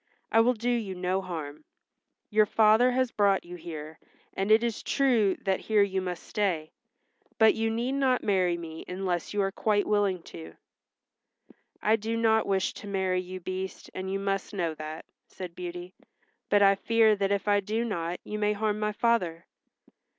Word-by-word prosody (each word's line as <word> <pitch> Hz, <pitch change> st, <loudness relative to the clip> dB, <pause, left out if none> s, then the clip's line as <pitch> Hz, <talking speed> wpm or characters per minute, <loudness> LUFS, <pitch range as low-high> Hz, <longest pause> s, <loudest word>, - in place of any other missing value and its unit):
"I 225 Hz, -, +5 dB
will 245 Hz, +2 st, +3 dB
do 235 Hz, +2 st, -1 dB
you 220 Hz, -6 st, -2 dB
no 185 Hz, +1 st, -1 dB
harm. 155 Hz, -5 st, -6 dB, 0.7 s
Your 215 Hz, 0 st, +4 dB
father 220 Hz, +4 st, +5 dB
has 255 Hz, -1 st, +1 dB
brought 200 Hz, -3 st, +2 dB
you 175 Hz, +1 st, -8 dB
here, 160 Hz, -2 st, -8 dB, 0.3 s
and 195 Hz, +2 st, -2 dB
it 220 Hz, +2 st, +5 dB
is 235 Hz, -2 st, -2 dB
true 240 Hz, -8 st, +2 dB
that 190 Hz, -1 st, +1 dB
here 215 Hz, -2 st, +3 dB
you 190 Hz, -1 st, -1 dB
must 180 Hz, -2 st, -5 dB
stay, 175 Hz, -7 st, -1 dB, 0.7 s
but 220 Hz, -1 st, +6 dB
you 225 Hz, 0 st, -1 dB
need 235 Hz, +3 st, -1 dB
not 270 Hz, -2 st, +1 dB
marry 185 Hz, -4 st, +2 dB
me 160 Hz, -1 st, -8 dB
unless 180 Hz, -2 st, -3 dB
you 205 Hz, -1 st, +1 dB
are 195 Hz, -, -1 dB
quite 205 Hz, +1 st, +1 dB
willing 200 Hz, -4 st, +1 dB
to." 80 Hz, 0 st, -11 dB, 1.3 s
"I 220 Hz, +2 st, +4 dB
do 225 Hz, +2 st, -3 dB
not 220 Hz, -1 st, +3 dB
wish 195 Hz, -1 st, 0 dB
to 205 Hz, -, -10 dB
marry 190 Hz, -2 st, 0 dB
you, 185 Hz, 0 st, -8 dB
Beast, 185 Hz, +1 st, -6 dB
and 190 Hz, 0 st, -4 dB
you 195 Hz, -, 0 dB
must 195 Hz, +1 st, -2 dB
know 170 Hz, -4 st, -1 dB
that," 155 Hz, +1 st, -7 dB, 0.2 s
said 180 Hz, -2 st, -8 dB
Beauty. 175 Hz, +1 st, -7 dB, 0.6 s
"But 205 Hz, 0 st, +5 dB
I 195 Hz, 0 st, +7 dB
fear 220 Hz, +2 st, +3 dB
that 195 Hz, 0 st, 0 dB
if 200 Hz, +1 st, -1 dB
I 205 Hz, 0 st, +4 dB
do 220 Hz, +4 st, -2 dB
not 175 Hz, -5 st, -3 dB
you 210 Hz, -, -5 dB
may 210 Hz, 0 st, +2 dB
harm 210 Hz, 0 st, -1 dB
my 210 Hz, 0 st, -1 dB
father." 185 Hz, -8 st, 0 dB
195 Hz, 180 wpm, -28 LUFS, 180-220 Hz, 1.3 s, I